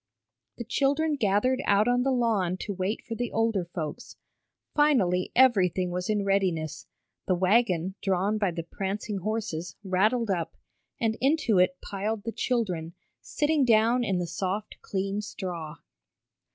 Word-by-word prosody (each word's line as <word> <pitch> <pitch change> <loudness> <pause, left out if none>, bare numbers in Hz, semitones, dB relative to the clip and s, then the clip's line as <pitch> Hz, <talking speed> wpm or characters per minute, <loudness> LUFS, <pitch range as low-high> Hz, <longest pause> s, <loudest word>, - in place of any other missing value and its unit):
The 235 - -4
children 285 +6 +1
gathered 235 +2 +1
out 205 +2 +4
on 245 0 +3
the 270 - +1
lawn 220 -8 +1
to 205 - -3
wait 190 +3 -2
for 230 - -5
the 240 +1 -3
older 225 -5 +1
folks. 165 -3 -6 0.6
Finally 215 -13 +2
everything 190 -8 +4
was 180 +2 -3
in 210 -2 +1
readiness, 175 -6 0 0.4
the 185 - +3
wagon, 185 -2 +2
drawn 195 +3 0
by 200 -3 +2
the 170 -1 -4
prancing 195 +3 -4
horses, 185 -5 -3
rattled 210 +4 +1
up, 170 -3 -2 0.4
and 225 -1 0
into 270 - +3
it 185 +10 +3
piled 205 +2 -3
the 230 - -3
children, 180 -11 -2 0.3
sitting 300 -1 +1
down 235 +1 +4
in 195 -5 0
the 175 - -1
soft, 190 +4 -4
clean 195 +1 -2
straw. 175 -7 -6
200 Hz, 145 wpm, -27 LUFS, 180-230 Hz, 0.6 s, out